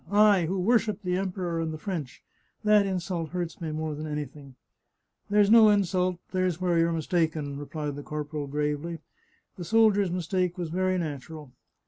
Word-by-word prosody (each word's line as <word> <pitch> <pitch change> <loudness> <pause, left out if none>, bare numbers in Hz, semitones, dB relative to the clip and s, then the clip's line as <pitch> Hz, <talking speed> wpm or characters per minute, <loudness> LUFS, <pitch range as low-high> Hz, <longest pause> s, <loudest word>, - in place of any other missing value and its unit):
" - - -21 0.2
I, 180 -5 +2
who 190 +3 -1
worship 215 0 +1
the 180 -1 0
Emperor 180 -3 -2
and 160 -1 -2
the 155 - -5
French 155 -7 -5 0.2
— - - -43
that 210 -1 +4
insult 175 -3 -3
hurts 175 -1 -4
me 165 - -3
more 155 0 -3
than 155 +1 -5
anything! 145 -2 -6 0.2
" - - -53
" - - -47
There's 205 0 +4
no 225 -2 +8
insult; 185 -3 +1
there's 185 -2 0
where 175 -2 +1
you're 165 0 +3
mistaken," 160 -3 -1
re 145 - -7
plied 150 -1 -4
the 145 - -6
corporal 150 -1 -5
gravely, 150 +3 -2 0.3
" - - -40
The 180 - -5
soldiers' 205 0 +3
mistake 180 +1 -1
was 175 -3 -3
very 185 +2 0
natural." 150 -3 -6
170 Hz, 190 wpm, -27 LUFS, 155-185 Hz, 0.3 s, no